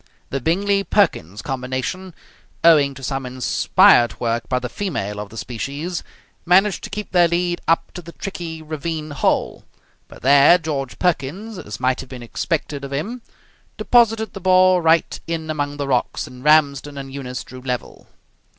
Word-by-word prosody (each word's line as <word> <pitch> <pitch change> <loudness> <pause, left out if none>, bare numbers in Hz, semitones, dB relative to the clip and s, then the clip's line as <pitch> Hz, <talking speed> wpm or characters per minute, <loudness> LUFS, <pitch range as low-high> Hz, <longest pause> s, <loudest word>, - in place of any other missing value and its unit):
The 135 - -2
Bingley 195 +7 +1
Perkins 110 - 0
combination, 135 +8 -4 0.5
owing 145 -5 +5
to 135 - -11
some 135 0 -2
inspired 125 -1 +3
work 115 0 -2
by 125 - +1
the 125 0 -3
female 105 - -4
of 105 -1 -6
the 115 - -12
species, 140 +10 -4 0.4
managed 190 +3 +3
to - - -6
keep 210 +1 -6
their 175 -2 +5
lead 175 +1 -1
up 165 - +1
to 180 - -8
the 170 0 -12
tricky 165 -4 -6
ravine 155 0 -4
hole, 145 - 0 0.4
but - - -15
there 140 +5 +7
George 145 -6 -4
Perkins, 180 +5 -2
as 105 -8 -8
might 130 0 +1
have 130 - -8
been 125 -2 -8
expected 145 +3 -3
of 140 - -6
him, 205 - -4 0.6
deposited 225 -2 +3
the 195 - -8
ball 185 0 +5
right 165 0 +2
in 160 -1 -3
among 145 -1 -3
the 140 -1 -3
rocks, 125 -3 0
and 125 0 -12
Ramsden 145 -2 +3
and 135 -1 -7
Eunice 125 -2 -5
drew 130 0 -11
level. 125 -1 -5
150 Hz, 165 wpm, -21 LUFS, 130-175 Hz, 0.6 s, there